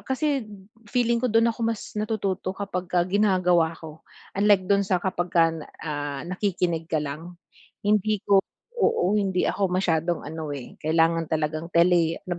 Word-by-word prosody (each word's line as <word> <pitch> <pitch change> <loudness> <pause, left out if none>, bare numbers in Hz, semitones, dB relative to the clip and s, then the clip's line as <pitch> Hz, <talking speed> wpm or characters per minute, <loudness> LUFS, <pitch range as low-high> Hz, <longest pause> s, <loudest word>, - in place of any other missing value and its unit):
kasi 270 -3 0 0.4
feeling 235 -1 +1
ko 250 - +2
dun 225 +1 +4
ako 230 - -7
mas 225 -2 -4
natututo 195 -3 -2
kapagka 180 -3 -1
ginagawa 180 -4 +2
ko. 160 -1 -11 0.3
Unlike 200 -1 +3
dun 200 +1 +3
sa 185 - +3
kapagka 175 -3 +2
na 160 -2 -8 0.2
ah, 145 -2 -4
nakikinig 180 -3 -1
ka 160 - 0
lang, 155 +4 -5 0.5
hindi 210 0 +1
ko 195 -1 +5 0.4
oo, 200 - +2
hindi 190 -2 0
ako 195 -2 0
masyadong 175 -2 0
ano 160 0 -6
eh, 135 -3 -10
kailangan 165 +1 +2
talagang 155 +1 -2
teli 170 -1 +3
ano 180 - -5
180 Hz, 150 wpm, -25 LUFS, 165-200 Hz, 0.5 s, ko